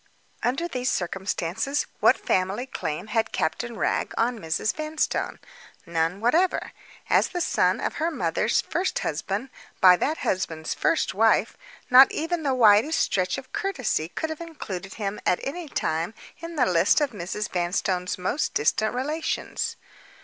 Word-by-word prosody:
Under 275 Hz, +8 st, 0 dB
these 255 Hz, -5 st, -2 dB
circumstances, 190 Hz, -, -2 dB
what -, -, +5 dB
family 190 Hz, +6 st, 0 dB
claim 165 Hz, -, -4 dB
had 220 Hz, +1 st, 0 dB
Captain 235 Hz, +8 st, -2 dB
Wragge -, -, 0 dB
on 235 Hz, 0 st, +1 dB
Mrs. 165 Hz, +4 st, -1 dB
Vanstone? 310 Hz, 0 st, -2 dB, 0.5 s
None 165 Hz, +2 st, -1 dB
whatever. 325 Hz, -, +2 dB, 0.4 s
As -, -, +4 dB
the 355 Hz, -, -4 dB
son 350 Hz, -, +2 dB
of -, -, -2 dB
her 325 Hz, -, +2 dB
mother's 215 Hz, -, +1 dB
first 365 Hz, +3 st, -2 dB
husband, 195 Hz, -, -3 dB, 0.3 s
by 185 Hz, -1 st, +8 dB
that 310 Hz, -, 0 dB
husband's 160 Hz, -4 st, -2 dB
first -, -, +1 dB
wife, -, -, +3 dB, 0.4 s
not 260 Hz, +2 st, +9 dB
even 330 Hz, +2 st, -2 dB
the 275 Hz, -4 st, 0 dB
widest 230 Hz, +6 st, +5 dB
stretch 185 Hz, -3 st, +1 dB
of 260 Hz, -, -10 dB
courtesy 385 Hz, -, -1 dB
could 315 Hz, -, -3 dB
have 315 Hz, -, -6 dB
included 195 Hz, -, -7 dB
him 205 Hz, -2 st, -3 dB
at 180 Hz, -, +2 dB
any 315 Hz, +3 st, -5 dB
time 165 Hz, -1 st, -2 dB, 0.2 s
in 335 Hz, 0 st, -7 dB
the 260 Hz, -5 st, +3 dB
list 180 Hz, -, +4 dB
of 290 Hz, -3 st, 0 dB
Mrs. 205 Hz, +1 st, -4 dB
Vanstone's 180 Hz, +1 st, -1 dB
most 185 Hz, +11 st, -1 dB
distant 215 Hz, +10 st, +1 dB
relations. 300 Hz, +6 st, -2 dB
220 Hz, 150 wpm, -25 LUFS, 180-300 Hz, 0.5 s, not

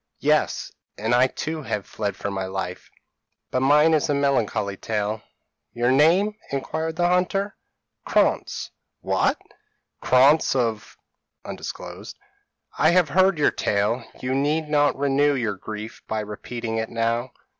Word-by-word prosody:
p> -, -, -1 dB
"'Yes; -, -, +1 dB, 0.3 s
and 110 Hz, +3 st, -1 dB
I 125 Hz, +2 st, +5 dB
too 155 Hz, +4 st, -4 dB
have 105 Hz, -8 st, -3 dB
fled 100 Hz, -3 st, -3 dB
for 100 Hz, +1 st, -4 dB
my 95 Hz, -1 st, -3 dB
life. 95 Hz, -1 st, -5 dB, 0.6 s
But 130 Hz, -, +1 dB
mine 150 Hz, +4 st, +5 dB
is 155 Hz, -2 st, +2 dB
a 145 Hz, -, +2 dB
melancholy 130 Hz, -8 st, 0 dB
tale.' 105 Hz, +1 st, -2 dB, 0.5 s
"'Your 120 Hz, +1 st, +1 dB
name?' 170 Hz, +10 st, +4 dB, 0.2 s
inquired 160 Hz, +4 st, -3 dB
the 175 Hz, +1 st, +2 dB
hunter. 190 Hz, +3 st, 0 dB, 0.5 s
"'Krantz.' -, -, 0 dB, 0.3 s
"'What! -, -, +1 dB, 0.6 s
Krantz 135 Hz, +4 st, +4 dB
of? 115 Hz, -4 st, -2 dB, 0.5 s
I 155 Hz, -, -5 dB
have 175 Hz, -3 st, +3 dB
heard 185 Hz, +3 st, +3 dB
your 150 Hz, -, +3 dB
tale; 105 Hz, +4 st, 0 dB, 0.2 s
you 130 Hz, +1 st, -2 dB
need 150 Hz, +3 st, 0 dB
not 145 Hz, -2 st, +2 dB
renew 140 Hz, +1 st, +2 dB
your 115 Hz, -5 st, -1 dB
grief 105 Hz, +3 st, -8 dB
by 110 Hz, -1 st, -2 dB
repeating 110 Hz, +2 st, -5 dB
it 110 Hz, 0 st, -2 dB
now. 115 Hz, +2 st, -1 dB
130 Hz, 135 wpm, -24 LUFS, 110-150 Hz, 0.6 s, I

